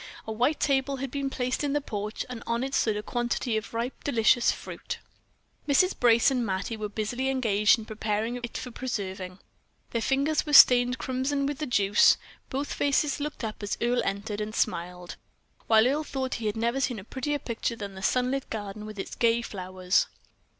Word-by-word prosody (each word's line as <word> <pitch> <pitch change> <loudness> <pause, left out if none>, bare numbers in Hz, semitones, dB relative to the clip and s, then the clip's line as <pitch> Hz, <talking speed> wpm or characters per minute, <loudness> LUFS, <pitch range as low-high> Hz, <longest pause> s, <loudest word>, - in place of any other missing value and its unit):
A 220 - -5
white 250 +8 +1
table 275 -1 +1
had 270 -1 -5
been 280 0 -2
placed 255 +1 -2
in 285 -1 0
the 295 - +2
porch, 210 -5 -4
and 250 -2 -7
on 235 +1 0
it 270 +1 -4
stood 220 -5 +2
a 210 - -4
quantity 240 0 -1
of 220 0 -3
ripe, 235 +3 -4
delicious 240 -2 +3
fruit. - - -6 0.7
Mrs. 365 +7 +4
Brace 235 +1 +5
and 250 -2 0
Mattie 200 +2 -2
were 215 -1 -4
busily 240 +5 -2
engaged 220 -6 +3
in 220 - -8
preparing 220 +2 -2
it 240 -1 -6
for 250 - -6
preserving; 190 -7 -4 0.5
their 230 - -1
fingers 280 +6 +1
were 295 - -5
stained 250 -2 +8
crimson 265 +2 -1
with 285 0 -3
the 305 - -2
juice. 205 -4 +5 0.3
Both 275 +2 -3
faces 285 0 +1
looked 295 -3 -5
up 215 -1 -4
as 205 - -3
Earle 240 +1 +1
entered, 205 +1 -3
and 215 +1 -4
smiled, 180 +1 -2 0.5
while 220 0 +6
Earle 285 +5 +1
thought 265 -3 -3
he 220 - -1
had 210 - -2
never 235 +4 0
seen 250 -4 0
a 195 - -7
prettier 275 +6 -2
picture 235 -3 -3
than 200 -3 -6
the 190 - -9
sunlit 255 +6 0
garden 210 -1 -5
with 215 -1 -9
its 195 - -5
gay 235 0 +2
flowers. 185 -2 0
235 Hz, 190 wpm, -27 LUFS, 210-265 Hz, 0.7 s, stained